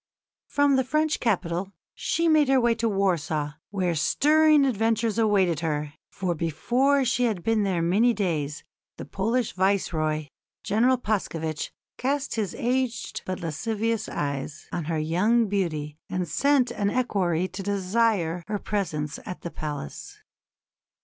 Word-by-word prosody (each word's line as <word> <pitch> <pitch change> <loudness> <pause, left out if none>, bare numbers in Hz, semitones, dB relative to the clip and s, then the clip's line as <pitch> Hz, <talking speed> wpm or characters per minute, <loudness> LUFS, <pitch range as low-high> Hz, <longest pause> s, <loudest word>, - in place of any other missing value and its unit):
From 285 -1 +3
the 260 - +3
French 305 +4 0
capital 185 -3 -1 0.2
she 335 0 0
made 310 -3 +5
her 265 0 +4
way 240 -1 +3
to 230 0 0
Warsaw, 165 -7 0 0.2
where 185 -4 0
stirring 300 - +4
adventures 225 -2 +1
awaited 195 -7 +3
her, 150 -3 -2 0.2
for 180 -2 -2
before 245 - +1
she 250 0 +2
had 210 -7 -1
been 225 -1 +2
there 185 -4 0
many 205 +8 +4
days 160 -9 -2 0.3
the - - -7
Polish 230 +4 -1
Viceroy, 160 -5 0 0.4
General 245 +5 +3
Paskevitch, 165 -9 -2 0.3
cast 275 +2 -1
his 210 -5 -2
aged 250 -1 -1
but 185 0 -3
lascivious 220 +7 -2
eyes 140 +1 -4
on 170 - -3
her 165 0 -1
young 195 +9 +2
beauty 155 -7 -2
and 180 -1 -2
sent 275 - +2
an 205 -4 0
equerry 185 -8 0
to 195 - -6
desire 195 -3 0
her 210 - -1
presence 160 -8 -3
at 180 - -6
the 170 - -6
palace. 145 - -6
200 Hz, 140 wpm, -26 LUFS, 165-235 Hz, 0.4 s, made